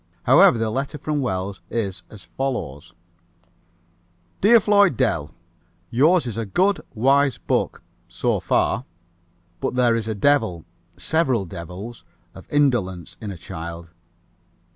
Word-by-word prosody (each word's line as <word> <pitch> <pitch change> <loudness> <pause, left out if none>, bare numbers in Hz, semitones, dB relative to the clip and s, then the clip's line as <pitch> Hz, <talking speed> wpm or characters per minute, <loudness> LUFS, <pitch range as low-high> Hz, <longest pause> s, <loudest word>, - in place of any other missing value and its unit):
However, 120 - +6
the 110 -1 -1
letter 135 +4 -3
from 150 0 -2
Wells 95 -4 -3
is 100 -6 -3
as 105 -4 -12
follows: 85 - -5 1.5
"Dear 230 +4 +7
Floyd 205 -2 +3
Dell: 85 - 0 0.6
Yours 155 +7 +4
is 115 -3 -5
a 115 - -2
good, 190 - +1
wise 135 +3 +3
book - - -2 0.2
so - - -1
far. 125 - 0 0.7
But - - -2
there 120 -2 +3
is 115 -1 -3
a 110 - -2
devil 110 - +1 0.3
several 130 -11 0
devils 90 +7 -8 0.3
of - - -14
indolence 120 - 0
in 105 - -5
a 95 - -6
child. 85 0 -8
115 Hz, 125 wpm, -22 LUFS, 95-140 Hz, 1.5 s, Dear